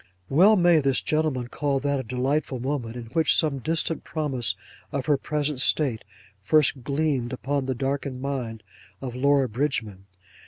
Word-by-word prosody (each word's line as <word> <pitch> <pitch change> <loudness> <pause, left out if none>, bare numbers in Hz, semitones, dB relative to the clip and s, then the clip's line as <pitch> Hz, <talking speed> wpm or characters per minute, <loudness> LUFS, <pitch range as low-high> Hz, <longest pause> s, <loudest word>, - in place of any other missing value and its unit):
Well 190 +10 +6
may 175 -4 +5
this 135 -3 +2
gentleman 150 -6 0
call 140 0 -1
that 140 0 0
a - - -3
delightful 130 +3 -1
moment, 125 -3 -3
in 120 - -6
which 160 -2 +3
some 150 -4 +2
distant 165 +3 -1
promise 140 -7 -1 0.4
of 140 -2 -2
her 150 - +3
present 145 -1 -2
state 135 -8 +2 0.4
first 135 +3 +3
gleamed 140 -3 -1
upon 135 +1 -2
the 130 - -1
darkened 135 0 -2
mind 125 -5 -4 0.4
of 130 -3 -5
Laura 140 +1 +3
Bridgman. 110 -6 -2
140 Hz, 155 wpm, -25 LUFS, 125-150 Hz, 0.4 s, Well